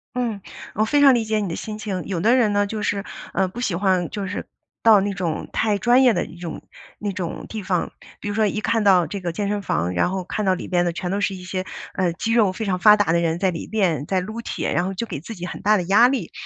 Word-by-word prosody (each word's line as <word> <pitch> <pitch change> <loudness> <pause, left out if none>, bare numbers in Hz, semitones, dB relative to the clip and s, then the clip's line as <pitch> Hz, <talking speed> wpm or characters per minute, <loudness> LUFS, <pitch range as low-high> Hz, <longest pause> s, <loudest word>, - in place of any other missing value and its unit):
嗯， 235 -5 -2 0.3
我 215 - +1
非 290 +6 +2
常 275 -2 +8
理 235 -2 +2
解 215 0 0
你 205 - -2
的 165 - -3
心 215 -1 -6
情。 200 -4 -4
有 185 -4 -2
的 230 +8 +4
人 235 -5 +3
呢， 205 0 +2
就 210 +1 -4
是， 200 -1 -1 0.3
呃， 190 - +1
不 220 +7 -7
喜 205 -8 0
欢 185 -2 +1
就 205 -2 -4
是 200 +2 -5 0.3
到 220 -2 +7
那 200 +1 -1
种 175 -4 -3
太 215 -2 +1
专 245 +4 +4
业 250 -3 +5
的 175 - -1
一 170 - -13
种 170 -2 -6 0.4
那 205 -1 -3
种 180 -3 -5
地 220 - -5
方。 185 -2 -1 0.3
比 - - -6
如 205 - -2
说 215 0 +2
一 210 - -2
看 225 +1 +1
到 185 -4 +5
这 200 +6 -5
个 175 -2 -3
健 200 +4 -2
身 205 0 -1
房 90 - -1
然 90 - +1
后 190 0 -3
看 210 +3 -3
到 190 - +4
里 - - -7
边 175 -1 +1
的 175 - +1
全 180 +1 -4
都 200 - 0
是 200 -1 0
一 180 - -10
些， 185 0 -4 0.3
呃， 180 -3 0
肌 225 +7 -2
肉 220 -5 +4
非 220 +4 -5
常 185 -2 -1
发 210 +2 +8
达 205 -5 +2
的 170 - +3
人， 165 0 0
在 190 0 +1
里 165 - -6
边 175 -10 0
在 190 - +1
撸 215 +5 -5
铁， - - -3
然 175 - +1
后 195 - -3
就 230 - -2
给 185 - -5
自 220 +9 -8
己 180 -2 -6
很 - - -7
大 210 +1 +4
的 180 - -1
压 200 +7 +5
力。 265 0 -2
195 Hz, 305 characters per minute, -22 LUFS, 180-215 Hz, 0.4 s, 常